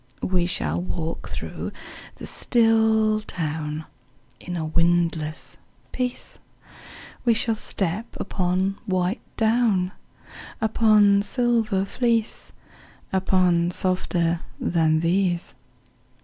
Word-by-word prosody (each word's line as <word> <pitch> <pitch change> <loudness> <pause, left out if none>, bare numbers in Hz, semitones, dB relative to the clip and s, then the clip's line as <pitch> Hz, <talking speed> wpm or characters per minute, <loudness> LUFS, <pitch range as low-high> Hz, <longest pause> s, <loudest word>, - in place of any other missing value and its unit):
We 180 -2 +1
shall 85 - 0
walk 125 - -4
through - - -5 0.4
the - - -9
still 220 -2 +3
town 155 -4 -4 0.5
In 175 0 -5
a 160 - -2
windless 165 -1 0 0.3
peace; 250 -1 -3 0.8
We 235 -2 +4
shall 225 +1 +1
step 205 0 -2
upon 190 +1 -1
white 185 +2 0 0.2
down, 220 -5 +2 0.7
Upon 215 -2 +4
silver 225 -4 +1
fleece, 230 +1 -1 0.6
Upon 180 -2 +3
softer 175 -2 0 0.2
than 160 -2 +2
these. 175 0 +1
185 Hz, 90 wpm, -24 LUFS, 170-220 Hz, 0.8 s, We